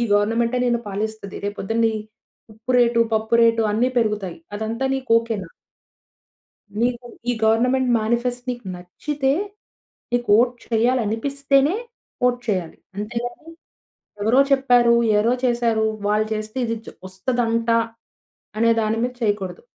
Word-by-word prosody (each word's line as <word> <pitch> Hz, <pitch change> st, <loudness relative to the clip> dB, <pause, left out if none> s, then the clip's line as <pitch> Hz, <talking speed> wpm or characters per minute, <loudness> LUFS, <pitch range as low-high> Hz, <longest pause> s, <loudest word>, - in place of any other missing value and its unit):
ఈ -, -, +1 dB
గవర్నమెంటే 230 Hz, +4 st, +2 dB
నిన్ను 240 Hz, -1 st, +1 dB
పాలిస్తది. 210 Hz, 0 st, -4 dB
రేపు 205 Hz, 0 st, -3 dB
పొద్దున్ని 225 Hz, +2 st, +1 dB, 0.6 s
ఉప్పు 225 Hz, +4 st, -4 dB
రేటు, 235 Hz, -1 st, +3 dB
పప్పు 220 Hz, +1 st, 0 dB
రేటు 230 Hz, 0 st, +4 dB
అన్ని 235 Hz, +4 st, +2 dB
పెరుగుతాయి 210 Hz, -6 st, -1 dB, 0.2 s
అదంతా 225 Hz, +5 st, -2 dB
నీకు 265 Hz, -3 st, -5 dB
ఓకేనా! 220 Hz, -6 st, -4 dB, 1.3 s
నీకు 245 Hz, 0 st, 0 dB, 0.2 s
ఈ -, -, +2 dB
గవర్నమెంట్ 250 Hz, +4 st, +3 dB
మేనిఫెస్ట్ 240 Hz, +3 st, -1 dB
నీకు 240 Hz, -4 st, -6 dB
నచ్చితే, 270 Hz, +10 st, -2 dB, 0.8 s
నీకు 240 Hz, 0 st, 0 dB
ఓట్ 245 Hz, +1 st, +3 dB
చేయ్యాలి 240 Hz, +3 st, +2 dB
అనిపిస్తేనే 275 Hz, -, +1 dB, 0.5 s
ఓట్ 245 Hz, 0 st, +1 dB
చేయ్యాలి. 185 Hz, -5 st, -1 dB, 0.2 s
అంతేగాని 240 Hz, +8 st, -5 dB, 0.7 s
ఎవరో 235 Hz, +5 st, +4 dB
చెప్పారు, 245 Hz, -3 st, +4 dB, 0.2 s
ఎవరో 230 Hz, +4 st, +3 dB
చేశారు. 235 Hz, -3 st, +2 dB, 0.2 s
వాళ్ళు 215 Hz, +1 st, +2 dB
చేస్తే 215 Hz, +3 st, -6 dB
ఇది 230 Hz, 0 st, -2 dB
జ -, -, -9 dB, 0.2 s
వస్తదంట 230 Hz, +3 st, -1 dB, 0.9 s
అనే 230 Hz, 0 st, +4 dB
దాని 220 Hz, +1 st, 0 dB
మీద 250 Hz, -, -2 dB
చేయకూడదు. 205 Hz, -, -1 dB
230 Hz, 125 wpm, -22 LUFS, 215-245 Hz, 1.3 s, రేటు